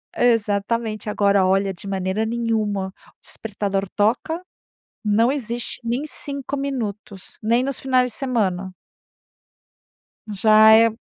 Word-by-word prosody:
Exatamente. 220 Hz, -1 st, 0 dB
Agora, 200 Hz, -2 st, +3 dB
olha, 195 Hz, +1 st, +2 dB
de 190 Hz, +3 st, -10 dB
maneira 190 Hz, +2 st, -1 dB
nenhuma. 220 Hz, -4 st, -1 dB
O 190 Hz, -, -24 dB
despertador 200 Hz, -2 st, -3 dB
toca, 240 Hz, +11 st, 0 dB, 0.6 s
não 220 Hz, +3 st, +3 dB
existe 240 Hz, -4 st, -4 dB
nem 235 Hz, +3 st, -1 dB
5 280 Hz, -2 st, -2 dB
minutos, 220 Hz, -8 st, -5 dB
nem 235 Hz, +3 st, +2 dB
nos 275 Hz, -1 st, -2 dB
finais 255 Hz, -2 st, +2 dB
de -, -, -2 dB
semana. 195 Hz, -8 st, -1 dB, 1.5 s
Já 215 Hz, +1 st, +5 dB
é 230 Hz, +1 st, +6 dB
220 Hz, 115 wpm, -22 LUFS, 200-240 Hz, 1.5 s, é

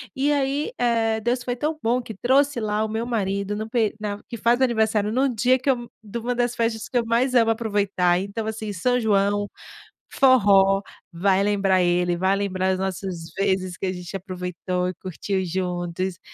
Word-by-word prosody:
e 280 Hz, +3 st, +1 dB
aí, 280 Hz, -, 0 dB
eh, 225 Hz, -2 st, +1 dB
Deus 240 Hz, +2 st, 0 dB
foi 245 Hz, -1 st, -2 dB
tão 305 Hz, +4 st, -2 dB
bom 245 Hz, +2 st, +1 dB
que 225 Hz, -, -8 dB
trouxe 270 Hz, +3 st, +2 dB
lá 215 Hz, 0 st, 0 dB
o 220 Hz, -, -2 dB
meu 225 Hz, +2 st, -2 dB
marido 200 Hz, -3 st, -1 dB
no 220 Hz, +1 st, -5 dB
peri 225 Hz, -3 st, +1 dB
na 205 Hz, -1 st, -4 dB
que 235 Hz, -, -5 dB
faz 235 Hz, +3 st, +2 dB
aniversário 220 Hz, -4 st, +2 dB
no 265 Hz, +3 st, +2 dB
dia 250 Hz, +4 st, +3 dB
que 270 Hz, -, -2 dB
eu 240 Hz, -3 st, 0 dB
de 215 Hz, +3 st, -5 dB
uma 245 Hz, +2 st, -2 dB
das 245 Hz, 0 st, 0 dB
festas 230 Hz, -1 st, -1 dB
que 250 Hz, -, 0 dB
eu 235 Hz, -, +1 dB
mais 245 Hz, +3 st, +1 dB
amo 225 Hz, -1 st, +5 dB
aproveitar. 200 Hz, -5 st, +1 dB
Então 200 Hz, +3 st, -4 dB
assim: 215 Hz, -1 st, -4 dB
São 250 Hz, +7 st, +1 dB
João, 205 Hz, -2 st, +1 dB, 0.6 s
forró, 200 Hz, -7 st, +5 dB, 0.3 s
vai 190 Hz, +3 st, +2 dB
lembrar 195 Hz, -2 st, +2 dB
ele! 175 Hz, 0 st, +2 dB
Vai 190 Hz, +3 st, +2 dB
lembrar 190 Hz, -2 st, -1 dB
as 185 Hz, -, -1 dB
nossas 185 Hz, -3 st, -4 dB
vezes 190 Hz, -2 st, 0 dB
que 190 Hz, -, -2 dB
a 185 Hz, -, -1 dB
gente 180 Hz, +1 st, -8 dB
aproveitou 180 Hz, -1 st, -3 dB
e 185 Hz, -, -4 dB
curtiu 190 Hz, +1 st, -3 dB
juntos, 180 Hz, 0 st, -3 dB
210 Hz, 190 wpm, -23 LUFS, 190-240 Hz, 0.6 s, amo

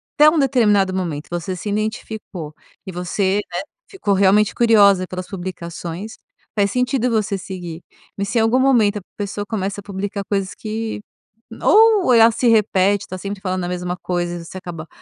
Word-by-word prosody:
Até 300 Hz, +1 st, +7 dB
um 315 Hz, -, 0 dB
determinado 210 Hz, -9 st, +3 dB
momento 165 Hz, -5 st, -3 dB
você 175 Hz, +2 st, -3 dB
se 195 Hz, +4 st, -5 dB
identificou 210 Hz, -6 st, -4 dB, 0.3 s
e 190 Hz, -, -6 dB
você, 190 Hz, +3 st, 0 dB
né, 175 Hz, -, -3 dB, 0.3 s
ficou 295 Hz, -, -1 dB
realmente 200 Hz, +2 st, +4 dB
curiosa 200 Hz, -5 st, +5 dB
pelas 185 Hz, 0 st, -6 dB
publicações, 180 Hz, +2 st, -6 dB, 0.4 s
faz 200 Hz, -1 st, +2 dB
sentido 250 Hz, +1 st, 0 dB
você 215 Hz, -3 st, 0 dB
seguir. 180 Hz, -3 st, -7 dB, 0.3 s
Mas 200 Hz, 0 st, -3 dB
se 235 Hz, -, -1 dB
em -, -, +4 dB
algum 225 Hz, +3 st, +3 dB
momento 235 Hz, -6 st, +3 dB
a -, -, -15 dB, 0.2 s
pessoa 205 Hz, 0 st, -3 dB
começa 200 Hz, -1 st, -3 dB
a -, -, -23 dB
publicar 200 Hz, +1 st, -4 dB
coisas 195 Hz, -2 st, -1 dB
que 220 Hz, 0 st, -4 dB, 0.6 s
ou 430 Hz, -, +5 dB
ela 230 Hz, 0 st, +7 dB
se 235 Hz, +2 st, 0 dB
repete, 205 Hz, -3 st, +3 dB
está 185 Hz, -, -7 dB
sempre 200 Hz, +1 st, -6 dB
falando 185 Hz, -1 st, -2 dB
a 175 Hz, -, -2 dB
mesma 180 Hz, 0 st, -3 dB
coisa 175 Hz, -1 st, -2 dB
e 170 Hz, -1 st, -7 dB
você 185 Hz, -, -9 dB
acaba 165 Hz, -3 st, -8 dB
200 Hz, 175 wpm, -20 LUFS, 185-220 Hz, 0.6 s, Até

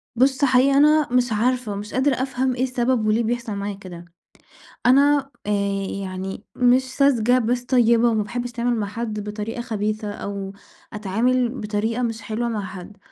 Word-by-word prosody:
بُصّ 265 Hz, +3 st, +3 dB
حقيقي 265 Hz, +1 st, +4 dB
أنا 300 Hz, +1 st, +5 dB
مش 250 Hz, -1 st, +2 dB
عارفة 240 Hz, +1 st, 0 dB
ومش 205 Hz, +1 st, -6 dB
قادرة 265 Hz, +1 st, +2 dB
أفهم 260 Hz, -1 st, -1 dB
إيه 255 Hz, -, -1 dB
السبب 245 Hz, -3 st, 0 dB
وليه 220 Hz, +2 st, +2 dB
بيحصل 235 Hz, -1 st, -2 dB
معايا 200 Hz, 0 st, -4 dB
كده، 175 Hz, -3 st, -10 dB, 0.8 s
أنا 280 Hz, +2 st, +4 dB, 0.2 s
آآ، 210 Hz, -, -1 dB, 0.5 s
يعني 190 Hz, +2 st, -6 dB
مش 250 Hz, +1 st, +4 dB
ساذجة 255 Hz, -3 st, +3 dB
بس 245 Hz, +1 st, -1 dB
طيبة 235 Hz, -2 st, +3 dB
وما 215 Hz, -2 st, +1 dB
باحبش 245 Hz, +3 st, -4 dB
أتعامل 240 Hz, 0 st, -1 dB
مع 210 Hz, -3 st, -2 dB
حد 215 Hz, 0 st, -4 dB
بطريقة 210 Hz, +3 st, -5 dB
خبيثة، 215 Hz, -2 st, -3 dB
أو 200 Hz, -1 st, -6 dB, 0.4 s
أتعامل 230 Hz, +5 st, +1 dB
بطريقة 220 Hz, 0 st, -2 dB
مش 225 Hz, -2 st, -2 dB
حلوة 225 Hz, +2 st, -3 dB
مع 215 Hz, -3 st, -2 dB
حد، 185 Hz, +2 st, -10 dB
235 Hz, 160 wpm, -22 LUFS, 210-255 Hz, 0.8 s, أنا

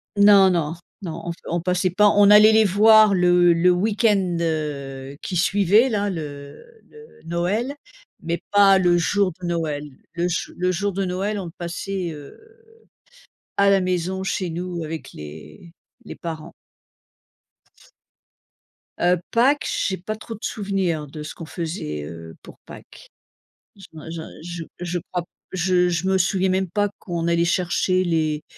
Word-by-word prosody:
Non, 200 Hz, -2 st, +6 dB
non, 165 Hz, -2 st, -1 dB, 0.3 s
non, 165 Hz, -2 st, -6 dB
on 170 Hz, -, -3 dB
p 170 Hz, -, -10 dB
on 170 Hz, +1 st, 0 dB
passait 180 Hz, +1 st, 0 dB
pas, 205 Hz, +4 st, +4 dB
on 205 Hz, 0 st, +6 dB
allait 210 Hz, +1 st, +8 dB
les 220 Hz, 0 st, +5 dB
voir 215 Hz, +1 st, +6 dB
le 175 Hz, -1 st, +4 dB
le 170 Hz, +2 st, +4 dB
week-end, 200 Hz, -2 st, +1 dB
heu, 140 Hz, -4 st, -4 dB
qui 185 Hz, -, -4 dB
suivait 205 Hz, +7 st, +3 dB
là 205 Hz, -2 st, -1 dB
le 145 Hz, -, -8 dB, 0.2 s
le 450 Hz, +1 st, -17 dB
Noël, 185 Hz, +11 st, -1 dB, 0.5 s
mais 170 Hz, 0 st, -3 dB
pas 200 Hz, -1 st, +6 dB
le 175 Hz, -2 st, +3 dB
jour 200 Hz, +2 st, +1 dB
de 175 Hz, -, -4 dB
Noël. 155 Hz, -4 st, -3 dB, 0.2 s
Le 175 Hz, 0 st, -1 dB
jou 180 Hz, -, -3 dB
le 180 Hz, +1 st, 0 dB
jour 200 Hz, +3 st, -2 dB
de 195 Hz, +1 st, -1 dB
Noël, 195 Hz, +3 st, -2 dB
on 190 Hz, -, -5 dB
le 165 Hz, -, -8 dB
passait, 175 Hz, +1 st, -4 dB
heu, 145 Hz, -2 st, -11 dB, 1.2 s
à 200 Hz, 0 st, +4 dB
la 195 Hz, -, +4 dB
maison 185 Hz, +1 st, -2 dB
chez 185 Hz, -2 st, -2 dB
nous 175 Hz, 0 st, -4 dB
avec 160 Hz, 0 st, -7 dB
les 75 Hz, -, -11 dB, 0.3 s
les -, -, -9 dB
parents. 160 Hz, -2 st, -7 dB, 2.5 s
Heu, 175 Hz, 0 st, +2 dB
Pâques, 270 Hz, +5 st, +3 dB, 0.2 s
j'ai 190 Hz, -, -2 dB
pas 215 Hz, +5 st, -5 dB
trop 225 Hz, +1 st, -8 dB
de 215 Hz, -, -16 dB
souvenirs 190 Hz, -7 st, -2 dB
de 150 Hz, +2 st, -8 dB
ce 155 Hz, -, -7 dB
qu'on 165 Hz, -, -9 dB
faisait, 160 Hz, -, -5 dB
heu, 80 Hz, +1 st, -9 dB
pour -, -, -14 dB
Pâques. -, -, -14 dB, 0.7 s
Je 195 Hz, -2 st, -14 dB
m'en 155 Hz, 0 st, -10 dB
j'en 160 Hz, -1 st, -6 dB, 0.2 s
je 170 Hz, -1 st, -6 dB, 0.2 s
je 175 Hz, 0 st, -3 dB
crois 180 Hz, -1 st, -1 dB
p -, -, -24 dB, 0.3 s
je 180 Hz, -1 st, +2 dB
je 175 Hz, +2 st, -1 dB
me 190 Hz, -, +2 dB
souviens 190 Hz, +1 st, +1 dB
même 190 Hz, 0 st, 0 dB
pas 205 Hz, +3 st, 0 dB
qu'on 170 Hz, -2 st, -3 dB
allait 170 Hz, 0 st, +2 dB
chercher 185 Hz, +1 st, +1 dB
les 155 Hz, -3 st, -1 dB
180 Hz, 165 wpm, -22 LUFS, 165-195 Hz, 2.5 s, allait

